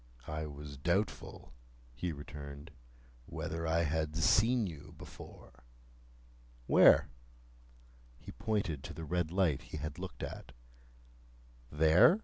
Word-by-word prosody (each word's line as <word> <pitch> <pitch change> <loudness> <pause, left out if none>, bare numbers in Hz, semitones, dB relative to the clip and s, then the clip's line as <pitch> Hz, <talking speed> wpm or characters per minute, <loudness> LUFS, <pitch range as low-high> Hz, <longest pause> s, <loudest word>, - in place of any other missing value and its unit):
"I 75 0 -4
was 70 -1 -8
doubtful," 85 - -2 0.4
he 85 +8 -3
returned, 75 -1 -8 0.6
"whether 80 0 -4
I 85 +1 +2
had 80 0 -1
seen 110 +9 +4
you 80 -6 -8
before." 65 +1 -12 1.0
"Where?" - - +7 1.1
He - - -10
pointed 100 -10 -2
to - - -7
the 80 +1 -6
red 85 +1 0
light 90 -7 +2
he - - -8
had 75 +1 -5
looked - - -6
at. 65 - -7 1.2
"There?" 80 - +6
80 Hz, 115 wpm, -33 LUFS, 75-90 Hz, 1.2 s, Where